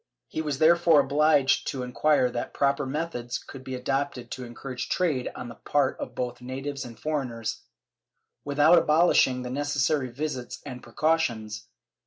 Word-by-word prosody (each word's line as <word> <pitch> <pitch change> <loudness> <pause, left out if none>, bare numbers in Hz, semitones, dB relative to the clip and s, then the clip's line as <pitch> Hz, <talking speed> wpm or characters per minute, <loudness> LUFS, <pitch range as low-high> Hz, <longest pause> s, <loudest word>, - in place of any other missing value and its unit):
He 160 - -3
was 150 -3 -2
therefore 165 0 +5
obliged 145 -1 +3
to 135 -3 -3
enquire 130 +1 +2
what 120 - -4
proper 140 0 +1
methods 130 -4 -3
could 135 -2 -11
be 130 0 -5
adopted 130 -1 -2
to 130 - -5
encourage 125 +1 -6
trade 155 -9 0
on 125 - -6
the 120 - -8
part 140 +3 0
of - - -6
both 125 -1 -4
natives 135 +2 -5
and 115 -2 -10
foreigners, 130 -7 -3 0.8
without 150 +4 +5
abolishing 155 -5 +3
the 125 - -5
necessary 145 0 0
visits 130 -1 -4
and 130 -3 -7
precautions. 120 -6 -1
135 Hz, 150 wpm, -27 LUFS, 125-150 Hz, 0.8 s, therefore